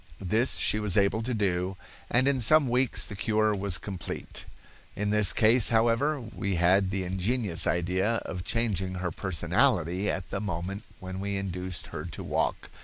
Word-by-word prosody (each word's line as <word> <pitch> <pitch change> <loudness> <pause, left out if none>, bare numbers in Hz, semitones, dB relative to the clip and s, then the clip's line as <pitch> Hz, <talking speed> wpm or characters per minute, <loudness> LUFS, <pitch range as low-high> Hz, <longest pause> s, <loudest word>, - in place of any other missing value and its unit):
This 110 +7 +2
she 105 - +3
was 105 -1 0
able 100 +2 +2
to 125 +3 -3
do, 95 -2 -1 0.3
and 130 +3 +3
in 135 -2 +1
some 150 +5 +5
weeks 125 +1 +1
the 105 - -7
cure 110 +1 +1
was 100 -2 -1
complete. 95 -4 -6 0.5
In 105 0 -1
this 105 -2 +4
case, 115 +1 +4
however, 120 +6 +2
we 110 -4 -4
had 95 +3 +3
the 95 0 -2
ingenious 95 +1 +1
idea 95 +6 0
of 90 -2 -5
changing 95 -5 -1
her 90 -1 -3
personality 90 +1 0
at 95 -2 -4
the 95 - -2
moment 100 +1 -4
when 95 0 -7
we 100 0 -3
induced 90 -2 -4
her - - -4
to - - -7
walk. - - -2
100 Hz, 170 wpm, -28 LUFS, 95-110 Hz, 0.5 s, some